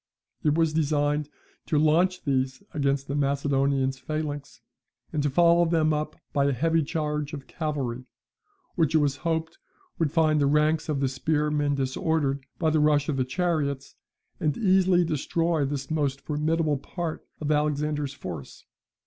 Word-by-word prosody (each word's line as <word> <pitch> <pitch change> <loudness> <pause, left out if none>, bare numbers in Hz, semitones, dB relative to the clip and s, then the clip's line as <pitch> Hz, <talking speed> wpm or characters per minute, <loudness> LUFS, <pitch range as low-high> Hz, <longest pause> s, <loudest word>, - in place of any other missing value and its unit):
It 150 -1 +2
was 160 -1 +2
designed 150 -1 +1 0.4
to 155 - +1
launch 170 +5 +3
these 130 -2 -1
against 140 -1 0
the 140 - -3
Macedonian 140 -1 +1
phalanx, 145 +1 -5 0.5
and 150 - 0
to 145 - +1
follow 170 +4 +5
them 160 -2 +2
up 150 0 -2 0.2
by 140 -1 +2
a 140 - +2
heavy 165 +5 +2
charge 150 -1 -2
of 140 -3 -6
cavalry, 135 -6 -3 0.7
which 160 -3 +1
it - - +7
was 145 -2 +1
hoped 160 0 -2 0.4
would 160 -4 +1
find 155 -2 +3
the 140 - +3
ranks 150 +2 +2
of 140 -2 0
the 135 - +2
spearmen 150 +1 0
disordered 140 +1 0
by 160 -2 +1
the 155 - +2
rush 150 -1 +3
of 140 - 0
the 130 - +2
chariots, 140 -3 -1 0.5
and 150 -2 0
easily 185 -4 +4
destroy 165 0 0
this 140 +1 -4
most 140 -3 0
formidable 155 0 0
part 170 +2 -5 0.2
of 150 -1 -1
Alexander's 150 -1 0
force. 80 - -8
150 Hz, 155 wpm, -26 LUFS, 140-160 Hz, 0.7 s, it